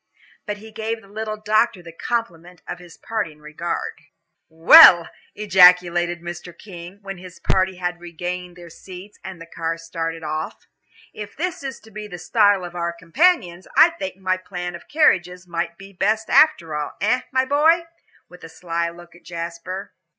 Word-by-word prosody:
But 210 0 -3
he 220 +1 -13
gave 220 +1 -4
the - - -17
little 215 +1 -5
doctor 215 -2 +1
the 170 - -10
compliment 175 -4 -5
of 180 - -6
his 175 -1 -15
parting 190 -9 -4
regard. 150 +3 -5 0.5
"Well," 165 +1 +8 0.3
ejaculated 180 -3 +4
Mr. 175 0 -8
King, 180 -1 -11
when 195 -2 -7
his 180 -1 -12
party 190 0 +1
had 175 -1 -4
regained 175 +1 -6
their 175 -1 -13
seats 185 +4 -12
and 190 -2 -8
the 165 - -10
car 165 0 -4
started 165 0 -5
off, 155 +1 -5 0.5
"if 210 -1 -9
this 355 +2 -3
is 270 -3 -6
to 220 - -17
be 210 0 -7
the 180 -4 -8
style 205 +1 +2
of 175 - -9
our 170 -1 -2
companions, 180 - +1
I 330 +2 +8
think 290 - -6
my 185 -1 -1
plan 180 -1 -6
of 170 - -11
carriages 180 - +2
might 170 -1 -4
be 195 +1 -13
best 215 +4 -1
after 170 - +4
all. 150 -1 -4
Eh, 245 +5 +1
my 260 0 +2
boy?" 315 +5 +3 0.4
with 180 0 -16
a 165 - -9
sly 170 0 -3
look 175 0 -14
at 175 - -18
Jasper. 170 +3 -7
180 Hz, 170 wpm, -21 LUFS, 170-210 Hz, 0.5 s, Well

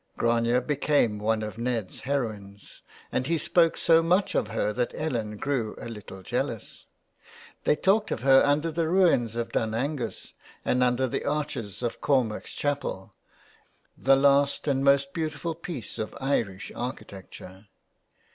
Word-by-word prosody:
Grania 115 +1 +2
became 135 -5 +1
one 110 +1 0
of 110 +1 -6
Ned's 120 -5 -2
heroines, 110 -7 -4 0.3
and 130 +1 -1
he 165 +1 +1
spoke 165 +1 +3
so 165 0 +5
much 180 +4 +2
of - - +1
her 105 0 -1
that 120 +2 -2
Ellen 115 -9 -3
grew 125 -4 -2
a - - -7
little 105 -4 -9
jealous. - - -4 0.8
They - - +4
talked 205 +6 +2
of - - -3
her 135 0 +7
under 150 +3 +2
the 160 0 -1
ruins 165 - +3
of 115 -1 -3
Dun 110 0 -1
Angus 130 -1 -3 0.3
and 125 - +2
under 125 +1 +3
the 125 - -2
arches 135 -8 -3
of 120 - -3
Cormac's 130 -7 0
Chapel, 145 -9 -3 0.8
the 135 +1 +4
last 140 +1 +3
and 135 -1 +1
most 140 0 +3
beautiful 155 0 -3
piece 160 -6 -6
of 110 - -4
Irish 115 -9 -1
architecture. 100 -5 -8
130 Hz, 145 wpm, -27 LUFS, 110-145 Hz, 0.8 s, her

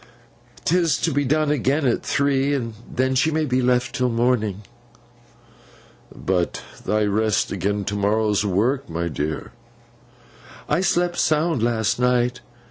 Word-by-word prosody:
'Tis 170 -1 +2
to 160 - -1
be 145 +1 +1
done 150 +2 +1
again 140 +1 +1
at 120 - +1
three, 140 0 +1
and 115 -4 -3 0.2
then 130 +1 0
she 135 +5 +2
may 155 0 0
be 130 -2 +1
left 125 -1 +1
till 125 0 0
morning.' 115 -4 0 1.5
'But 90 -2 -2 0.2
thy 105 0 +1
rest 105 0 +1
agen 100 +2 -1
to 100 - -2
morrow's 105 0 +1
work, 110 +7 0
my 85 +1 -2
dear.' 75 +1 -4 1.2
'I 150 +4 +1
slept 175 -1 +1
sound 155 -3 +1
last 115 -2 0
night. 125 0 +1
125 Hz, 135 wpm, -22 LUFS, 105-145 Hz, 1.5 s, Tis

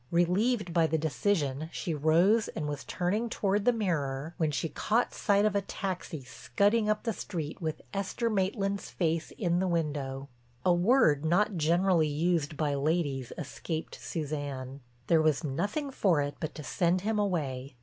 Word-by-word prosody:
Relieved 180 +3 +1
by 165 -1 +4
the 160 - +1
decision 155 0 0
she 170 - -3
rose 170 +9 +3
and 150 - -4
was 145 -1 -4
turning 205 +6 -1
toward 205 -2 0
the 245 - +6
mirror, 160 - -2
when 160 -2 +1
she 150 +3 -1
caught 225 +8 0
sight 205 -1 +2
of 210 -2 +1
a 200 - +3
taxi 185 -6 -5
scudding 205 - +1
up 215 0 +1
the 230 - -1
street 160 -6 -5
with 155 -2 -3
Esther 200 +4 -1
Maitland's 195 -1 -1
face 165 -2 -1
in 175 -3 +1
the 190 - +1
window. 145 -5 -2 0.4
A 180 - +5
word 175 - +4
not 195 +6 +2
generally 170 +1 +3
used 155 0 0
by 150 -2 0
ladies 140 -3 0
escaped 160 -2 -5
Suzanne. 140 0 -4 0.3
There 165 +2 +4
was 155 0 +2
nothing 205 - -2
for 185 - +2
it 145 0 -1
but 155 - -4
to 150 - -7
send 175 +6 +1
him 215 +2 0
away. 140 -10 -2
170 Hz, 165 wpm, -30 LUFS, 150-200 Hz, 0.4 s, the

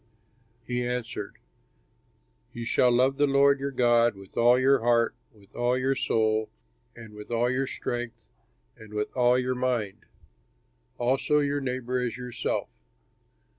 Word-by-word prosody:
He 125 0 -2
answered, 120 -4 -4 1.2
"You 120 -1 -6
shall 125 +1 +3
love 130 +3 +2
the 145 0 +3
Lord 140 0 +4
your 140 +1 -2
God 120 -3 +3
with 95 -1 -15
all 120 +1 +5
your 135 +1 +4
heart, 115 0 +2 0.2
with 100 -3 -23
all 120 +1 +1
your 130 +1 +1
soul, 110 -4 0 0.5
and 110 -2 -12
with 105 0 -11
all 120 +1 +1
your 130 +1 -1
strength 120 -2 -5 0.5
and 110 -3 -13
with 105 0 -3
all 125 -1 +4
your 130 0 0
mind; 125 -6 -2 0.9
also 130 +4 +1
your 145 -1 0
neighbor 125 -1 -2
as 125 -1 -3
yourself." 125 -1 -3
125 Hz, 140 wpm, -27 LUFS, 115-130 Hz, 1.2 s, all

